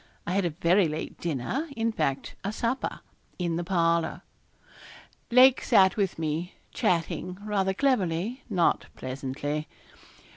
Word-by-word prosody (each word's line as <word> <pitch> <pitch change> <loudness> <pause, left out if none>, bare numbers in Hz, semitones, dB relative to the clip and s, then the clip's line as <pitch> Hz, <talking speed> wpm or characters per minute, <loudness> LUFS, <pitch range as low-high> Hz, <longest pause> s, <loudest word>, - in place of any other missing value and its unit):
I - - -2
had 195 0 +1
a - - +2
very 175 +3 +3
late 155 0 -5
dinner 170 - -2
in 230 0 +1
fact 135 -10 -2
a 200 - -1
supper 235 +4 -2 0.4
in 175 -2 -1
the 175 - -2
parlour. 170 -2 +1 1.1
Lake 255 +1 +7
sat 190 -5 +5
with 200 -4 0
me 160 +2 -3 0.2
chatting, 180 +1 -1
rather 195 -2 0
cleverly, 220 -2 0
not 180 -5 +2
pleasantly. 140 +3 -4
180 Hz, 125 wpm, -27 LUFS, 165-210 Hz, 1.1 s, Lake